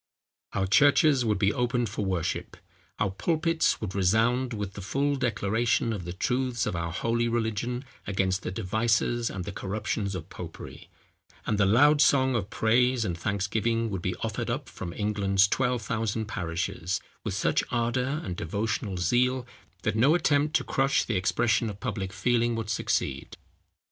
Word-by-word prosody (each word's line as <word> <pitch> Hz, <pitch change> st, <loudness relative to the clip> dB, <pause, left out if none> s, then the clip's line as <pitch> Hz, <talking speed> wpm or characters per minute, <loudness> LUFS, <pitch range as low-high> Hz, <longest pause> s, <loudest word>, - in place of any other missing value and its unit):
Our 95 Hz, -, 0 dB
churches 145 Hz, -, +5 dB
would 105 Hz, -2 st, +1 dB
be 100 Hz, 0 st, +2 dB
opened 125 Hz, -1 st, 0 dB
for 105 Hz, +1 st, -3 dB
worship; 95 Hz, -4 st, -2 dB, 0.4 s
our 100 Hz, -2 st, 0 dB
pulpits 165 Hz, -, +1 dB
would 100 Hz, -4 st, -4 dB
resound 115 Hz, +7 st, +2 dB
with 105 Hz, -4 st, -4 dB
the 100 Hz, -, -7 dB
full 140 Hz, +9 st, 0 dB
declaration 115 Hz, -2 st, 0 dB
of 95 Hz, -5 st, -5 dB
the 85 Hz, -, -4 dB
truths 125 Hz, +5 st, -1 dB
of 105 Hz, -, -2 dB
our 85 Hz, -1 st, -2 dB
holy 115 Hz, +6 st, 0 dB
religion 120 Hz, +2 st, -2 dB, 0.2 s
against 95 Hz, -1 st, 0 dB
the -, -, -4 dB
devices 115 Hz, +5 st, 0 dB
and 95 Hz, -2 st, -5 dB
the -, -, -4 dB
corruptions 100 Hz, +1 st, -3 dB
of 80 Hz, -4 st, -6 dB
popery; -, -, -9 dB, 0.6 s
and 105 Hz, -2 st, 0 dB
the 100 Hz, -, +4 dB
loud 145 Hz, +8 st, +5 dB
song 130 Hz, -2 st, +4 dB
of 110 Hz, -4 st, -1 dB
praise 120 Hz, +2 st, +2 dB
and 85 Hz, -, -2 dB
thanksgiving 110 Hz, +5 st, -1 dB
would 95 Hz, -3 st, -3 dB
be -, -, -2 dB
offered -, -, -3 dB
up -, -, -3 dB
from 85 Hz, -, -6 dB
England's 100 Hz, -1 st, +2 dB
twelve 125 Hz, +1 st, 0 dB
thousand 110 Hz, 0 st, -1 dB
parishes, 90 Hz, -1 st, -3 dB, 0.2 s
with -, -, -3 dB
such -, -, +1 dB
ardour 125 Hz, +4 st, 0 dB
and 90 Hz, -2 st, -4 dB
devotional 100 Hz, +3 st, -2 dB
zeal, 125 Hz, +8 st, +1 dB, 0.4 s
that 110 Hz, -, 0 dB
no 135 Hz, +9 st, +5 dB
attempt 150 Hz, -3 st, +2 dB
to -, -, +3 dB
crush 135 Hz, +1 st, +1 dB
the 115 Hz, -, -2 dB
expression 110 Hz, +4 st, +1 dB
of 100 Hz, -1 st, -8 dB
public 100 Hz, -6 st, -3 dB
feeling 120 Hz, +3 st, +1 dB
would 110 Hz, -1 st, -3 dB
succeed. 105 Hz, -, -2 dB
110 Hz, 165 wpm, -27 LUFS, 100-125 Hz, 0.6 s, churches